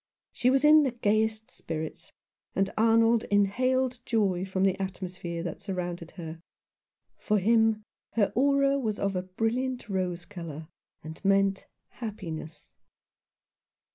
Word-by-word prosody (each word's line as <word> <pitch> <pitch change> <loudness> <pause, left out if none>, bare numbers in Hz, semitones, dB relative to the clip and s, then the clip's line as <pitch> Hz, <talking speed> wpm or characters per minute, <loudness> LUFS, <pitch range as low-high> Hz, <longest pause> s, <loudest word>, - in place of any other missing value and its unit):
She 250 - +1
was 270 +1 +3
in 305 +1 +8
the 280 - +2
gayest 220 -1 0
spirits, 160 -1 -6 0.4
and 195 0 +1
Arnold 225 +1 +4
inhaled 250 +5 +1
joy 195 -7 +1
from 190 0 -1
the 195 0 +2
atmosphere 180 -3 -5
that 170 -3 -5
surrounded 175 -3 -4
her. 165 -1 -7 0.8
For 210 - +1
him 220 +1 +3 0.3
her 210 -3 +2
"aura" 275 +2 +3
was 215 -5 -2
of 200 -1 -1
a 180 - 0
brilliant 225 +7 -2
rose 180 -3 -2
colour, 165 -5 -8 0.4
and 160 +3 -9
meant 195 0 +2 0.2
happiness. 190 -9 -7
200 Hz, 125 wpm, -28 LUFS, 180-230 Hz, 0.8 s, in